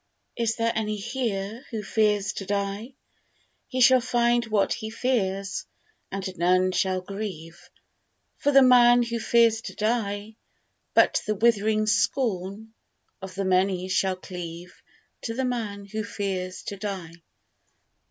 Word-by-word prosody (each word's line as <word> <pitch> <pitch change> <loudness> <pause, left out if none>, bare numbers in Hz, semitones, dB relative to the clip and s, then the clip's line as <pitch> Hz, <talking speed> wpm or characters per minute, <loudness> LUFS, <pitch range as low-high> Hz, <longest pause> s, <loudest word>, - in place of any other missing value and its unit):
Is 230 -1 0
there 230 0 +1
any 215 -1 -1
here 225 -1 -3
who 220 -3 -4
fears 210 -1 +1
to 195 - -6
die 200 +5 -3 0.7
He 255 - -2
shall 255 0 +7
find 240 -1 +2
what 210 -2 +2
he 220 -1 -5
fears, 220 - -1 0.4
and 190 -1 -4
none 185 +2 +3
shall 185 0 0
grieve 180 -4 -7 0.7
For 290 - +2
the 275 -1 +7
man 245 -1 +6
who 235 0 -3
fears 230 -1 +3
to - - -8
die: 215 -1 -2 0.6
But - - +4
the 215 - +1
withering 215 0 +2
scorn 210 -1 -1 0.5
of 190 -1 -8
the 195 0 -2
many 185 0 +1
shall 190 0 +1
cleave 175 -1 -8 0.5
To 230 - -4
the 265 +1 -1
man 215 -5 -3
who 215 +2 -4
fears 190 -3 -4
to 200 - -6
die. 190 -5 -5
210 Hz, 135 wpm, -26 LUFS, 190-235 Hz, 0.7 s, shall